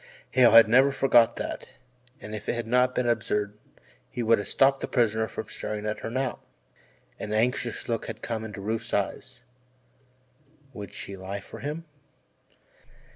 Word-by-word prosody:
Hale 125 Hz, -3 st, +6 dB
had 115 Hz, -1 st, +9 dB
never 130 Hz, +5 st, +5 dB
forgot 120 Hz, -4 st, +4 dB
that, -, -, -5 dB, 0.5 s
and 105 Hz, -, -9 dB
if 105 Hz, -1 st, -5 dB
it -, -, +2 dB
had 120 Hz, -1 st, -3 dB
not 125 Hz, +2 st, +2 dB
been 125 Hz, -, +1 dB
absurd 105 Hz, -3 st, 0 dB, 0.5 s
he 120 Hz, -, -3 dB
would 115 Hz, 0 st, +4 dB
have 100 Hz, -, -5 dB
stopped 135 Hz, 0 st, +3 dB
the -, -, -3 dB
prisoner 110 Hz, -2 st, +1 dB
from 110 Hz, -, -6 dB
staring 105 Hz, -1 st, -5 dB
at 105 Hz, 0 st, -2 dB
her -, -, -5 dB
now. 130 Hz, +1 st, -2 dB, 0.8 s
An 105 Hz, -, -5 dB
anxious 120 Hz, +1 st, 0 dB
look 115 Hz, -1 st, -2 dB
had -, -, -7 dB
come 115 Hz, -2 st, -3 dB
into 105 Hz, -3 st, -7 dB
Rufe's 110 Hz, +3 st, -2 dB
eyes 125 Hz, -, -3 dB, 1.3 s
would 105 Hz, -4 st, -8 dB
she 100 Hz, -, -6 dB
lie 95 Hz, +1 st, -5 dB
for 100 Hz, -, -11 dB
him? 155 Hz, +3 st, -5 dB
115 Hz, 165 wpm, -27 LUFS, 105-125 Hz, 1.3 s, had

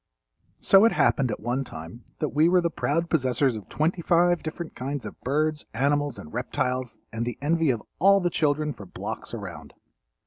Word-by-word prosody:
So 195 Hz, 0 st, +6 dB
it 230 Hz, -, +4 dB
happened 135 Hz, -4 st, +2 dB
at 105 Hz, -, -3 dB
one 120 Hz, +5 st, -1 dB
time 85 Hz, +1 st, -9 dB
that 150 Hz, -, -1 dB
we 155 Hz, +5 st, +3 dB
were 180 Hz, 0 st, +5 dB
the 170 Hz, -1 st, 0 dB
proud 165 Hz, +2 st, 0 dB
possessors 130 Hz, -4 st, +2 dB
of 105 Hz, -4 st, -9 dB
twenty 165 Hz, +3 st, 0 dB
five 175 Hz, +1 st, +3 dB
different 160 Hz, +1 st, -6 dB
kinds 135 Hz, +1 st, -4 dB
of -, -, -9 dB
birds, 150 Hz, +3 st, 0 dB
animals 145 Hz, +1 st, +1 dB
and 75 Hz, -, -10 dB
reptiles 125 Hz, -1 st, -2 dB, 0.2 s
and 115 Hz, +1 st, -2 dB
the 120 Hz, -1 st, -4 dB
envy 160 Hz, +2 st, +1 dB
of 120 Hz, -4 st, 0 dB, 0.2 s
all 200 Hz, +2 st, +6 dB
the 175 Hz, -2 st, 0 dB
children 150 Hz, -1 st, +1 dB
for 100 Hz, -, -11 dB
blocks -, -, -6 dB
around. -, -, -8 dB
145 Hz, 185 wpm, -26 LUFS, 125-165 Hz, 0.2 s, So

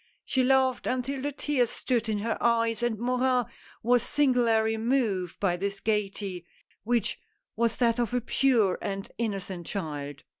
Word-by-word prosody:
She 260 Hz, -, +1 dB
laughed 260 Hz, -1 st, +2 dB
until 255 Hz, +2 st, -1 dB
the 290 Hz, +2 st, -2 dB
tears 275 Hz, -4 st, 0 dB
stood 235 Hz, -3 st, -1 dB
in 215 Hz, -, 0 dB
her 220 Hz, +2 st, -1 dB
eyes, 230 Hz, -1 st, +2 dB
and 240 Hz, -2 st, 0 dB
Morin 250 Hz, +1 st, +1 dB, 0.4 s
was 245 Hz, +1 st, +4 dB
singularly 235 Hz, -5 st, +2 dB
moved 220 Hz, -7 st, 0 dB
by 180 Hz, -3 st, +1 dB
this 200 Hz, +2 st, -3 dB
gayety 200 Hz, -4 st, -2 dB, 0.2 s
— -, -, -37 dB
which 235 Hz, 0 st, 0 dB, 0.4 s
was 230 Hz, 0 st, +1 dB
that 235 Hz, -1 st, +2 dB
of 240 Hz, -1 st, 0 dB
a 245 Hz, -, +1 dB
pure 235 Hz, -5 st, +2 dB
and 195 Hz, 0 st, -4 dB
innocent 195 Hz, -6 st, -3 dB
child. 145 Hz, -7 st, -5 dB
230 Hz, 155 wpm, -28 LUFS, 200-250 Hz, 0.4 s, was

